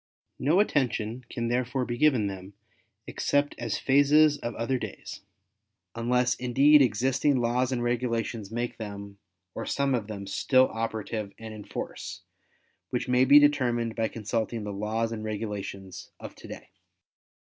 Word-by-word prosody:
No 155 +8 +3
attention 125 - 0
can 115 -1 -3
therefore 125 +2 -1
be 120 - -3
given 130 -5 +3
them 95 0 -6 0.5
except 145 0 0
as - - -2
phases 145 +2 +4
of 120 -1 -5
other 125 +3 -1
days, - - -7 0.7
unless 125 +1 +1
indeed 140 +4 +5
existing 135 +3 +2
laws 120 +2 +1
and 120 -2 -1
regulations 115 -3 -2
make 120 +2 -4
them, 100 -2 -8 0.3
or - - -5
some 140 -1 0
of 115 -5 -1
them 100 -2 -6
still 130 +6 +3
operative 110 -2 -4
and 110 -1 -8
in 105 -1 -9
force, - - -6 0.7
which - - -2
may 125 +1 +4
be 140 +2 +8
determined 125 -6 +3
by 115 -1 0
consulting 110 +1 -3
the 105 -1 -5
laws 110 +3 -2
and 110 -2 -5
regulations 105 -3 -5
of - - -8
today. - - -11
120 Hz, 145 wpm, -27 LUFS, 110-130 Hz, 0.7 s, be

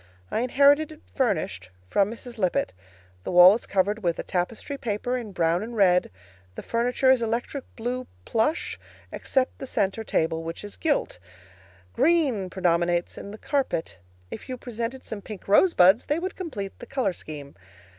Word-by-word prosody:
I - - 0
inherited 280 +5 +4
it, 310 - -13
furnished, 185 - -1 0.2
from 200 - +2
Mrs. 235 +1 -9
Lippett. 180 - 0 0.5
The - - -4
wall 180 +1 +9
is 230 - -4
covered 200 +3 +1
with 170 -3 0
a - - -4
tapestry 195 +10 -3
paper 245 -1 -2
in 235 -5 -5
brown 170 -1 +1
and 230 +2 -6
red; 180 -3 +4 0.5
the - - -7
furniture 245 +3 +2
is 260 -2 +3
electric 235 +4 -2
blue 250 +2 -3 0.2
plush, 230 +9 0 0.3
except 265 -1 -1
the 270 - -5
center 200 -1 -1
table, 160 -5 0
which 165 +3 -6
is 205 - -8
gilt. 290 - -1 0.7
Green 280 - +2
predominates 175 -1 +1
in - - -8
the 210 - -8
carpet. 255 - -2 0.3
If - - -8
you 255 - -4
presented 240 +1 -5
some 215 -2 -6
pink 205 -2 -9
rosebuds, 200 - +5
they 295 - +1
would 370 +3 -4
complete 210 - -6
the 240 - -10
color 260 -7 0
scheme. 145 -4 -9
220 Hz, 165 wpm, -26 LUFS, 180-255 Hz, 0.7 s, wall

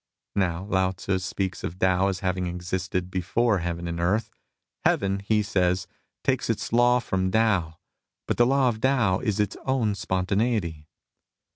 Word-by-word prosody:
Now 90 -2 0
Lao 95 -2 +1
Tzu 95 +1 -2
speaks 95 0 -3
of 85 - -4
Tao 95 +1 +3
as 95 -1 -2
having 90 -1 -1
existed 90 +1 -3
before 100 +4 +1
Heaven 85 0 -3
and 85 0 -3
Earth: 105 +6 0 0.3
" - - -55
Heaven," 100 0 +2
he 105 +2 +1
says, 90 -3 +1 0.2
" - - -55
takes - - 0
its - - -2
law 120 +1 +5
from 95 -6 -1
Tao; 95 -7 +1 0.5
but - - 0
the 120 - +5
law 135 0 +3
of 110 -2 -4
Tao 120 -9 +2
is 105 -5 -1
its 105 -2 0
own 125 -6 +1
spon 95 -2 -2
taneity." 100 -7 0
95 Hz, 170 wpm, -26 LUFS, 90-110 Hz, 0.5 s, law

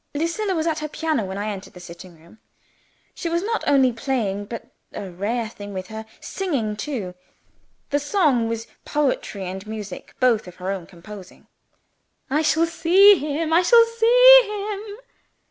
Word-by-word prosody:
Lucilla 335 +6 -1
was 320 -1 -1
at 320 -2 -1
her 305 - -4
piano 310 -5 -2
when 190 +1 -6
I 205 +1 -3
entered 195 -1 -9
the 180 - -12
sitting 175 0 -12
room. 170 +7 -20 0.7
She 340 - -4
was 340 +2 -1
not 450 +2 -2
only 265 -3 +4
playing 225 -5 -2
but 230 +3 -8 0.3
(a 195 -2 -7
rare 220 +6 -2
thing 205 -2 -10
with 185 0 -6
her) 220 0 -8
singing 275 - -3
too. 210 -6 -5 0.8
The 290 - +2
song 290 - +1
was, 230 0 -4 0.2
poetry 260 -9 -2
and 190 +3 -7
music 210 -4 -8
both, 235 -6 +2
of 180 - -11
her 185 +1 -4
own 185 -4 -5
composing. 190 +1 -13 0.9
"I 300 +3 +2
shall 320 +1 +2
see 365 +5 +6
him! 310 +2 -2
I 340 - +5
shall 465 +5 +6
see - - +8 0.3
him!" 410 0 -7
245 Hz, 165 wpm, -22 LUFS, 200-330 Hz, 0.9 s, see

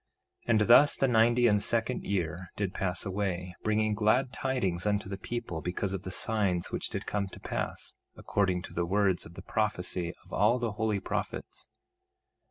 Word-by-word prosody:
1:26 - - -10
And 110 -2 +5
thus 120 +7 +7
the 135 - +2
ninety 120 0 +4
and 105 -3 +4
second 115 +3 0
year 90 -1 -2
did 100 -3 -2
pass 95 0 -2
away, 95 -2 -2
bringing 110 0 +1
glad 115 +5 +2
tidings 105 -9 -1
unto 105 -1 0
the 100 - -4
people 115 -9 -4
because 95 +3 -2
of 95 - -3
the 95 - -6
signs 95 -3 0
which - - -2
did - - -4
come 100 -1 -1
to - - -11
pass, - - -4 0.2
according 95 -3 0
to - - -9
the 85 0 -1
words 95 -2 +1
of 85 - -15
the - - -9
prophecy 90 -5 -1
of - - -15
all 120 - +4
the 120 -3 -1
holy 105 -1 0
prophets. - - -5
105 Hz, 180 wpm, -30 LUFS, 90-110 Hz, 0.2 s, thus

